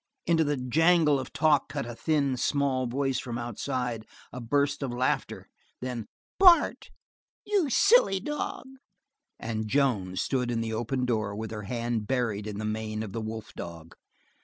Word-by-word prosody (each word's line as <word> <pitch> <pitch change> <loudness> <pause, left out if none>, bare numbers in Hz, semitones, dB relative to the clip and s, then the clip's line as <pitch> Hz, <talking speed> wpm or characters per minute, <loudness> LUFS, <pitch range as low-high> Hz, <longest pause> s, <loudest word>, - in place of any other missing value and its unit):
Into 165 -1 +3
the 145 -1 0
jangle 155 +3 +3
of 130 - -6
talk 155 -2 +2
cut 140 -4 -3
a 120 - -6
thin, 140 0 0
small 130 -1 0
voice 135 +1 -1
from 120 -3 -5
outside, 120 -1 -3 0.3
a 125 - -6
burst 140 +5 0
of 135 -3 -2
laughter. 125 +1 -1 0.3
Then: 125 -3 -5 0.3
"Bart, 360 -3 +5 0.6
you 395 -8 +1
silly 400 - +5
dog!" 295 - -4 0.7
and 110 -1 -3
Joan 105 -8 +1
stood 125 +5 -1
at 120 -1 -1
the 115 -1 -2
open 120 +3 -1
door 110 -4 -1
with 110 +1 -5
her 105 -2 -6
hand 115 -3 -2
buried 110 -5 -1
in 105 -1 -5
the 110 - -3
mane 110 0 -3
of 105 - -7
the 115 - -3
wolf 110 0 -6
dog. 85 -1 -8
125 Hz, 160 wpm, -28 LUFS, 110-145 Hz, 0.7 s, Bart